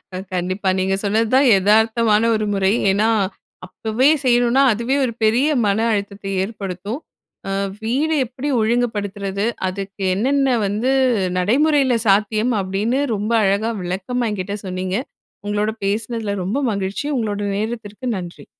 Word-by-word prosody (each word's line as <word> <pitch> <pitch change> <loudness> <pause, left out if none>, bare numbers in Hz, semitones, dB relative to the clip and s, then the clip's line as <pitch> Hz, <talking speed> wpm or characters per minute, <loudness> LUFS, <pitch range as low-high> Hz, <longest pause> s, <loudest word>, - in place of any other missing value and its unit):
அ - - -3 0.2
கண்டிப்பா 185 +2 -1
நீங்க 190 +1 +1
சொன்னதுதான் 225 +6 +3
எதார்த்தமான 220 +2 +3
ஒரு 215 - -1
முறை. 195 -1 +2 0.2
ஏன்னா 205 +3 +2 0.6
அப்பவே 220 +8 +1 0.2
செய்யணுன்னா, 245 +1 +3
அதுவே 235 +5 -1
ஒரு 235 - -3
பெரிய 240 +7 +3 0.2
மன 200 +1 +1
அழுத்தத்தை 200 -1 -4
ஏற்படுத்தும். 200 - -5 0.5
அ - - -2 0.3
வீட 265 +8 0 0.2
எப்டி 260 +4 -5
ஒழுங்குபடுத்துறது? 205 -3 -1 0.2
அதுக்கு 195 +1 -5
என்னென்ன 265 +3 +2
வந்து 215 +6 0 0.5
நடைமுறைல 265 - +3
சாத்தியம் 215 +4 +2
அப்படின்னு 205 +8 -1 0.2
ரொம்ப 210 +2 -3
அழகா 200 +3 +1
விளக்கமா 195 +7 -2
என்கிட்ட 200 0 -4
சொன்னீங்க. 185 0 -3 0.5
உங்களோட 210 +1 0
பேசுனதுல 215 +1 -2
ரொம்ப 215 +9 -1
மகிழ்ச்சி. 200 +6 -3
உங்களோட 210 -3 -2 0.2
நேரத்திற்கு 220 +2 -5
நன்றி. 175 -1 -9
215 Hz, 125 wpm, -20 LUFS, 195-240 Hz, 0.6 s, சொன்னதுதான்